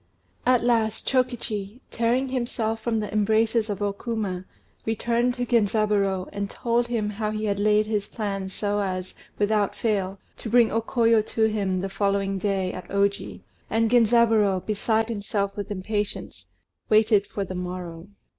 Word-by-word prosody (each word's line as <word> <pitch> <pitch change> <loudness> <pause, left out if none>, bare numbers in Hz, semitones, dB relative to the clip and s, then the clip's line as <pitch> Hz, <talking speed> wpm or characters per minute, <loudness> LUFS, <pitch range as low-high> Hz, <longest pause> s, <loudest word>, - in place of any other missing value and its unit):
At 250 -2 +4
last 225 -2 +1
Chokichi, 240 -4 -1
tearing 240 +3 +1
himself 230 -3 -2
from 225 0 0
the 210 -1 -4
embraces 220 +1 +2
of 205 0 -2
O 200 -1 0
Kuma, 200 -4 -3 0.4
returned 235 +2 0
to 245 -1 -2
Genzaburô, 205 -4 +1
and 200 0 -3
told 235 +2 0
him 230 -3 -1
how 210 +1 -2
he 215 0 -2
had 200 -1 0
laid 210 +1 +3
his 210 -2 -1
plans 195 -3 -4
so 205 +1 -1
as, 185 -2 -3 0.2
without 210 -1 +1
fail, 200 -4 -1 0.2
to 225 - -6
bring 235 0 +5
O 225 - +1
Koyo 230 -1 +3
to 225 - 0
him, 200 -4 0
the 195 - -2
following 195 0 0
day, 190 -2 -1
at 185 - -8
Oji, 200 0 -1 0.3
and 225 0 +1
Genzaburô, 225 -5 +4
beside 220 +1 0
himself 200 -2 -2
with 205 0 -5
impatience, 205 +1 -4 0.4
waited 215 -1 +4
for 200 - -3
the 185 - -6
morrow. 180 -2 -6
215 Hz, 155 wpm, -25 LUFS, 200-230 Hz, 0.4 s, bring